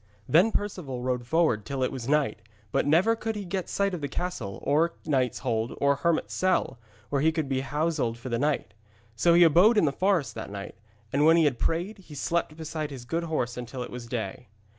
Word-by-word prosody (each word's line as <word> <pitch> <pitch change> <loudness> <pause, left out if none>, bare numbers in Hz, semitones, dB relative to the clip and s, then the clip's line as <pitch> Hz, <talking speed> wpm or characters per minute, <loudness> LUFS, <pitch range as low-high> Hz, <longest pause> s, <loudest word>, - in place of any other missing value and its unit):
Then 180 +9 +5
Perceval 165 -13 -3
rode 125 -1 -2
forward 160 -9 +2
till 135 +3 -3
it 130 - 0
was 130 -2 -5
night; 140 -8 +1 0.3
but - - +1
never 180 +10 +4
could 225 0 -3
he 205 -1 -5
get 185 0 -3
sight 200 -1 0
of 175 - -4
castle 130 - -4
or 160 +4 +2
knight's 130 -5 +1
hold 115 -1 -1
or 140 0 +3
hermit's 170 +2 0
cell 185 -9 +1 0.3
where 140 -1 +1
he 160 +2 +4
could 160 -2 -2
be 135 -1 0
houselled 145 -4 -1
for 120 +2 -7
the 115 -1 -1
night. 145 +1 -1 0.4
So 170 +9 +4
he 175 - +7
abode 180 +8 +6
in 205 - +5
the 145 - +2
forest 170 - +1
that 110 -2 -6
night, 100 0 -7 0.4
and 140 +2 +3
when 165 +2 +6
he 165 - +5
had 130 -5 +1
prayed 180 +6 -1
he 165 -6 -12
slept 155 +2 -1
beside 155 -1 -4
his 130 -4 -8
good 165 +6 -2
horse 125 -7 -2
until 125 +1 -5
it - - -9
was 120 -1 -7
day. 110 -6 -4
150 Hz, 215 wpm, -27 LUFS, 125-170 Hz, 0.4 s, he